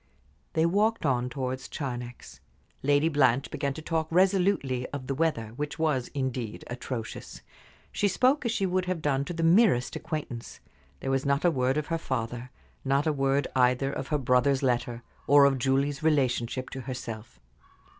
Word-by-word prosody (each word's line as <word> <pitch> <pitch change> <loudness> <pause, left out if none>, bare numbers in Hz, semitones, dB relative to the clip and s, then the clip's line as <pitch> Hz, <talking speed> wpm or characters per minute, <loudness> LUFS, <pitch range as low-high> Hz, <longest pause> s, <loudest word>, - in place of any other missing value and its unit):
They 160 - +2
walked 210 +4 +1
on 125 -3 +1
towards 130 -1 -4
Charnex. 125 -3 -6 0.4
Lady 145 +2 +3
Blanche 140 -4 +2
began 140 -1 -2
to 160 - -8
talk 160 -1 -1
resolutely 180 -8 +2
of 140 -2 -6
the 135 - -2
weather, 135 -7 0
which 150 0 -4
was, 150 -6 0
indeed, 130 -5 -3
atrocious. 125 -2 -6 0.5
She 205 - +1
spoke 255 +9 +2
as 235 - 0
she 200 -3 0
would 185 0 0
have 180 -3 -3
done 140 -1 +1
to 175 - -5
the 165 - -2
merest 170 - +4
acquaintance. 135 -7 -5 0.4
There 135 - -2
was 135 0 +1
not 140 +3 +1
a 175 - +5
word 130 -1 +1
of 150 - -1
her 165 - 0
father; 120 -3 -4 0.3
not 140 +2 +1
a 155 - +2
word, 135 0 +1
either, 125 +1 +3
of 135 - -4
her 150 - +1
brother's 130 +1 +2
letter, 120 -2 0 0.2
or 140 0 +7
of 135 -2 +2
Julie's 140 +2 +1
relationship 130 -5 0
to 130 - -5
herself. 120 - -7
140 Hz, 170 wpm, -28 LUFS, 125-160 Hz, 0.5 s, or